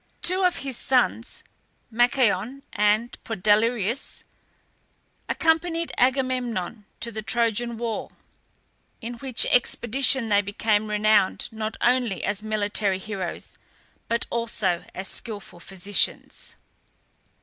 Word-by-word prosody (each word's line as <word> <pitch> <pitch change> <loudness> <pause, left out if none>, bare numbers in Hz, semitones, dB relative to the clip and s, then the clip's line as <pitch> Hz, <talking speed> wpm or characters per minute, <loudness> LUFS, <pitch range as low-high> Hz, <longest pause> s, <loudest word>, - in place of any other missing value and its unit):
Two 370 +2 +4
of 360 -1 +3
his 265 -3 -3
sons, 250 -2 0 0.5
Machaon 240 +1 +1
and 215 +3 +2
Podalirius, 220 +3 0 1.1
accompanied 330 +1 +1
Agamemnon 245 -6 0 0.2
to 235 - -2
the 215 -1 -5
Trojan 230 +1 0
war, 230 -1 -3 0.9
in 235 +2 -6
which 260 -2 +3
expedition 245 +1 +2
they 205 -1 +4
became 210 +1 0
renowned, 210 -2 +2
not 220 0 -4
only 245 -6 +1
as 205 +1 -1
military 210 -2 0
heroes, 190 -2 -6 0.5
but 235 0 0
also 225 -7 0
as 190 +1 -3
skilful 205 -6 -6
physicians. 195 +3 -1
225 Hz, 100 wpm, -25 LUFS, 205-245 Hz, 1.1 s, Two